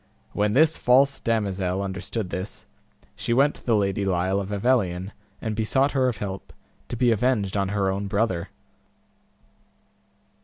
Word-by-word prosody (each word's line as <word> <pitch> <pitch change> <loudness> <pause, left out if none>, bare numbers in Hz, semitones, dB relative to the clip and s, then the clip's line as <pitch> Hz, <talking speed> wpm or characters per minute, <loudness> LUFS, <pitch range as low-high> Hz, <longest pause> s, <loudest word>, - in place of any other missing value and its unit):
When 105 0 +1
this 160 +4 +4
false 135 +2 +4
damosel 100 -5 -1
understood 100 +1 -4
this, 95 +2 -5 0.5
she 115 - -2
went 140 +3 +4
to - - -17
the 115 - +2
Lady 100 -1 0
Lile 95 0 +1
of 100 -1 -4
Avelion, 100 -4 0 0.3
and 110 -1 -3
besought 130 +6 +1
her 130 -2 +2
of 120 -4 -1
help, 95 -1 -6 0.4
to 120 - -5
be 120 0 +3
avenged 110 -4 +1
on 100 -1 +1
her 100 -1 0
own 100 +1 -3
brother. 100 -4 -1
105 Hz, 150 wpm, -25 LUFS, 95-120 Hz, 0.5 s, this